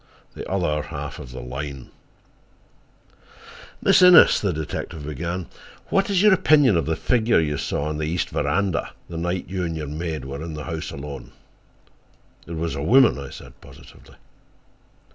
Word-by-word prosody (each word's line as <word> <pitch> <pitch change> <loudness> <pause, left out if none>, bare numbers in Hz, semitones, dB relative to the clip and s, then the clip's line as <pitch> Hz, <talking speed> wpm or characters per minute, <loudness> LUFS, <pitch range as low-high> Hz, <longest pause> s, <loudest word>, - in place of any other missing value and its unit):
THE - - -8
OTHER 85 -6 0
HALF 70 -3 -6
OF 65 - -9
THE 65 - -7
LINE 70 +1 -7 1.9
"Miss - - +5
Innes," 180 -2 +8
the 100 - +1
detective 80 -1 -5
began, 85 +5 -4 0.4
"what 195 +1 +1
is 195 -1 +2
your 210 -2 +7
opinion 145 - +4
of 80 - 0
the 80 - 0
figure 115 +2 +2
you 75 -2 0
saw 70 - -2
on 75 0 -3
the 75 - -2
east 85 +3 -2
veranda 100 -3 -1 0.2
the 85 - -6
night 90 +2 -2
you 95 -1 -3
and 80 -2 -3
your 75 - -4
maid 80 +1 -4
were 70 +2 -6
in 80 -1 -6
the 75 - -6
house 80 +3 -5
alone?" 70 -2 -8 1.1
"It 85 - -6
was 80 +1 -2
a 70 - -4
woman," 120 - +5
I 70 -1 -7
said - - -13
positively. - - -16
80 Hz, 165 wpm, -23 LUFS, 75-95 Hz, 1.9 s, Innes